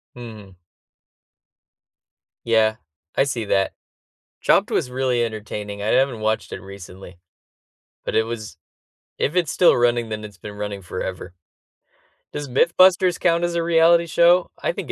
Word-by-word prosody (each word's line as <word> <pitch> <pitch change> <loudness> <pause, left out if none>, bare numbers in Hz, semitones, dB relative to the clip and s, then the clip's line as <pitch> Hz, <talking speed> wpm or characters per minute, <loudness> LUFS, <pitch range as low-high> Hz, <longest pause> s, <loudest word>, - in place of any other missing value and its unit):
Hmm. 110 -6 -11 1.9
Yeah, 110 -1 +2 0.4
I - - +4
see 120 -5 -3
that. 95 -1 +1 0.7
Chopped - - +3
was 125 - -1
really 125 -2 0
entertaining, 105 -2 -6
I - - -3
haven't 130 -3 +2
watched 110 0 -1
it - - -6
recently, 95 -2 -12 0.9
but - - -3
it 110 - +4
was 115 -2 -7 0.6
if 150 - -1
it's 170 -7 +1
still 180 - +4
running, 120 -1 +1
then 110 0 -5
it's 105 -2 -10
been 105 +3 -9
running 105 -1 -5
forever. 90 0 -6 1.0
Does 145 -1 -5
MythBusters 175 +6 +3
count 170 0 +2
as 175 0 -1
a 170 - 0
reality 170 0 +4
show? 170 +2 +3
I - - 0
think - - -6
115 Hz, 140 wpm, -22 LUFS, 105-165 Hz, 1.9 s, I